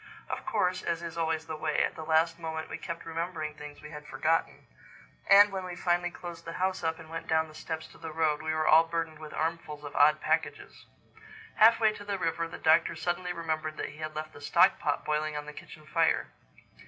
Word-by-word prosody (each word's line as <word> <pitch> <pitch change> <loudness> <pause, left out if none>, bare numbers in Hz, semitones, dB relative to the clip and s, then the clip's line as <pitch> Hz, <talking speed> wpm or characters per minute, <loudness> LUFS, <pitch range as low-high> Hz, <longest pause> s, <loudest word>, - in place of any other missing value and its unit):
Of - - -5
course, 180 0 +1
as 170 0 -2
is 170 -1 -6
always 160 -1 -1
the 160 -1 -5
way, 155 - +1
at - - -1
the - - -7
last 165 +1 +2
moment 160 -1 -5
we - - -5
kept 170 0 -6
remembering 165 -1 -3
things 150 -1 -11
we 150 - -9
had 150 -1 -9
forgotten; 165 +2 0 0.6
and 205 0 +8
when 190 -1 -3
we 180 -1 -6
finally 175 0 +1
closed 175 -1 -9
the 165 - -7
house 185 0 -1
up 160 0 0
and - - -12
went 165 +1 -6
down 160 0 +2
the 155 - -14
steps 160 +1 -5
to - - -17
the 160 -1 -6
road, 155 -1 +1
we 155 0 -2
were 155 0 0
all 160 +1 +7
burdened 165 -1 -3
with 155 -1 -9
armfuls 160 -2 -3
of 145 - -8
odd 150 +1 +5
packages. 160 +1 -2 0.7
Halfway 220 0 +6
to 205 - -9
the 200 -1 -2
river, 165 -1 -1
the 165 - -8
Doctor 165 +1 +4
suddenly 175 +2 -2
remembered 160 -2 -3
that - - -3
he 145 - -13
had 155 0 -5
left 155 0 -5
the 145 - -12
stock - - +4
pot - - -1
boiling 150 0 -1
on 150 - -5
the 150 - -8
kitchen 155 +1 -12
fire. 165 +1 +1
160 Hz, 225 wpm, -29 LUFS, 155-170 Hz, 0.7 s, and